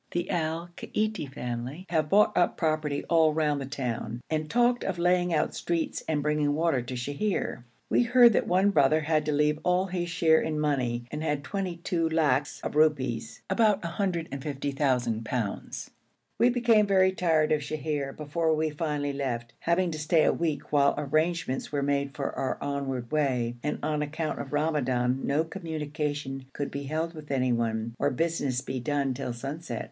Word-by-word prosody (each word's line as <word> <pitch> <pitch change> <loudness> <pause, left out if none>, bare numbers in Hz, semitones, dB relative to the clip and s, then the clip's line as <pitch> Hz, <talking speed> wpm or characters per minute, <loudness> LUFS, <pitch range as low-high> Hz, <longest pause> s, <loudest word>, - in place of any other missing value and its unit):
The 175 +1 -2
Al 165 0 -1
Kaiti 215 -10 -2
family 125 +6 -5
have 155 -3 +1
bought 210 +3 +4
up 175 - +2
property 155 -3 0
all 160 -2 +4
round 150 -3 +1
the 135 - -5
town, 120 -4 -4
and 155 -1 -1
talked 240 +1 +3
of 190 -2 -2
laying 175 0 +2
out 155 - +1
streets 170 -1 -2
and 150 -2 0
bringing 150 -1 +1
water 160 -5 +1
to 125 +2 -6
Sheher. 145 - -2 0.2
We - - +3
heard 240 -1 +6
that - - +1
one 190 +3 +3
brother 155 -2 +4
had 155 0 +1
to 150 -1 +1
have 150 0 0
all 180 +1 +2
his 175 -2 -3
share 160 -2 +4
in 155 -1 -2
money, 125 -5 0
and 150 - -4
had 150 -2 -1
twenty 190 -2 -3
two 170 -1 -1
lacs 145 -4 +1
of - - -4
rupees, 150 -6 +1
about 210 -4 +2
150,000_l_. 135 - -2 0.5
We 240 - +6
became 235 -4 +4
very 190 -1 +4
tired 160 -5 +2
of 155 -1 +2
Sheher 150 -1 -3
before 160 +2 0
we 155 0 0
finally 145 -2 -2
left, 120 -4 -3
having 170 +1 +1
to 155 - -5
stay 155 +1 +3
a - - +4
week, 160 -3 -2
while 140 -1 +4
arrangements 155 -1 0
were 145 -1 0
made 140 -1 0
for 140 0 -2
our 130 - -1
onward 135 -4 -3
way, 130 -6 +1
and 150 - -2
on 150 0 0
account 155 +1 -3
of 135 - -6
Ramadan 135 -5 +1
no 145 +3 +2
communications 150 -5 -4
could 145 - -3
be 140 0 -5
held 160 +4 -2
with 155 -2 -10
anyone, 115 -4 0
or 145 - +2
business 145 -3 -1
be 130 -1 -4
done 140 0 0
till 125 -1 -4
sunset. 135 +1 -5
150 Hz, 170 wpm, -28 LUFS, 135-165 Hz, 0.5 s, heard